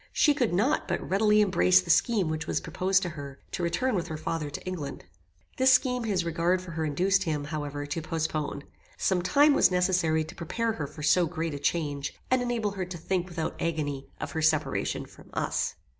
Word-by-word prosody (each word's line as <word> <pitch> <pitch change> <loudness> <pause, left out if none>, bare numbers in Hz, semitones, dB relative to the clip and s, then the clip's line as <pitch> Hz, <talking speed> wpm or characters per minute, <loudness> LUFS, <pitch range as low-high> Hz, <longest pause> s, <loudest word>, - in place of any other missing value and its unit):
She 295 - +4
could 250 -6 0
not 215 - +1
but - - -2
readily 210 +2 +4
embrace 90 - +5
the 90 - 0
scheme 215 -7 +3
which 155 0 -3
was - - 0
proposed 190 +1 +1
to 180 - -2
her, 140 -4 -8
to - - -3
return 245 +10 0
with 175 -4 -1
her 160 -2 -5
father 155 -1 -3
to 145 - -7
England. 160 - -5 0.5
This 260 0 +5
scheme 250 -2 +2
his 190 -5 0
regard 170 +2 +1
for 180 -1 -9
her 160 0 -2
induced 185 +6 +2
him, 150 -3 -1
however, 145 -1 -4
to 145 +3 -3
postpone. 155 -3 -3 0.3
Some 185 -2 +1
time 290 +10 +5
was - - +5
necessary 180 -3 +2
to 155 - -10
prepare 225 +7 -2
her 155 -9 -4
for 150 - -10
so 170 +3 +4
great 165 -1 -3
a 145 - -5
change 145 -2 -1 0.2
and 255 -1 +4
enable 235 -4 -1
her 190 -2 -3
to 180 -1 -7
think 180 +2 -2
without 165 -2 -4
agony 145 -4 -2
of - - -4
her 160 - -2
separation 155 -10 +1
from - - -17
us. - - -1
170 Hz, 205 wpm, -28 LUFS, 155-195 Hz, 0.5 s, embrace